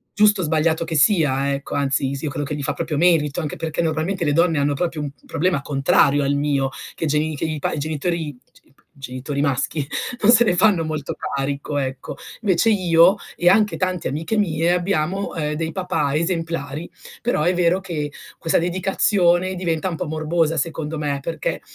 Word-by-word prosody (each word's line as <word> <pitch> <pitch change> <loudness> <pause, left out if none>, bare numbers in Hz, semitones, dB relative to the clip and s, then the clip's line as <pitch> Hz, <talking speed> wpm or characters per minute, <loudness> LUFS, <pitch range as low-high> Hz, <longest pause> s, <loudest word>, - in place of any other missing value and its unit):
giusto 210 -2 +4
o - - -1
sbagliato 160 +1 +1
che 165 -1 -4
sia, 140 -5 +3
ecco, 140 0 -5
anzi, 140 -1 0
sì, 140 - -7
io 150 - -2
credo 145 0 -3
che 150 - -3
gli 145 - -4
fa - - +1
proprio 160 -3 -3
merito, 160 -3 +2
anche 155 -4 -4
perché 160 +1 -2
normalmente 165 +3 -1
le 145 - +1
donne 165 0 +2
hanno 145 0 +1
proprio 165 0 -2
un 145 -1 -4 0.2
problema 175 -3 0
contrario 140 0 +2
al 140 - +1
mio: 140 -2 0 0.3
che - - -3
geni 150 +1 0
che 145 - -3
i 155 -1 -3
pa - - -1
i - - -3
genitori 155 +2 -2
g 125 - -27
p - - -46 0.2
genitori 135 +2 -5
maschi 140 +1 0 0.4
non 210 - +5
se 240 0 +8
ne 180 -6 +1
fanno 190 -3 +4
molto 155 -2 -4
carico, 140 +1 -3
ecco. 130 -1 -4 0.2
Invece 200 0 +2
io 180 -2 +5 0.2
e 175 - 0
anche 210 +3 +4
tante 185 -2 -1
amiche 160 +10 -2
mie 170 -4 +1
abbiamo, 180 +1 -1
ehm, 150 -2 -2
dei 160 +1 -3
papà 150 -5 -1
esemplari; 165 -3 -2 0.3
però 235 -10 0
è 175 +3 +2
vero 180 +1 +2
che 155 -6 -4 0.3
questa 165 - +1
dedicazione 185 0 +2
diventa 175 -1 -1
un 175 - -3
po' 170 - -4
morbosa 160 +1 0
secondo 160 +1 -2
me, 145 -2 -2
perché 160 +1 -3
160 Hz, 195 wpm, -21 LUFS, 145-175 Hz, 0.4 s, se